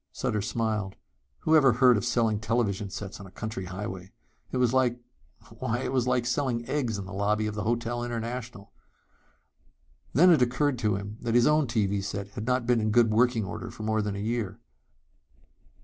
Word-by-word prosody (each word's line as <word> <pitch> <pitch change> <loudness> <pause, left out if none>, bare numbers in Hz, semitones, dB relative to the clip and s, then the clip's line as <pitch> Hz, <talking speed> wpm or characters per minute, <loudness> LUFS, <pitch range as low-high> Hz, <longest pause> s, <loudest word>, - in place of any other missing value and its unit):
Sutter 115 -5 -1
smiled. 105 -2 -2 0.5
Whoever 150 -5 +5
heard 125 +1 +5
of 105 - -1
selling 110 -3 +1
television 105 -3 -1
sets 100 +1 -7
on 100 - -9
a - - -15
country 110 -2 -5
highway? 95 0 -6 0.4
It - - -2
was 125 -1 +2
like 125 -2 +2 0.6
why, 120 +3 -1
it 130 - -3
was 125 -2 +1
like 125 -1 +1
selling 120 -1 -1
eggs 125 -8 -1
in 100 - -5
the 95 - -9
lobby 105 +2 0
of 105 - -2
the 105 - -3
Hotel 120 +1 -1
International! 115 - -5 1.4
Then 180 +6 +6
it 155 -6 +5
occurred 125 +2 +1
to 105 -4 +1
him 100 +2 -6
that 115 -1 -1
his 120 0 +5
own 150 -2 +3
TV 100 -4 0
set 100 0 -4
had 105 +2 -7
not 125 -1 +1
been 120 -1 +2
in 110 - 0
good 115 0 +4
working 115 -1 +2
order - - -6
for 110 - -9
more 110 0 +1
than 105 -1 -3
a - - -4
year. 110 -1 -2
115 Hz, 190 wpm, -27 LUFS, 105-125 Hz, 1.4 s, Then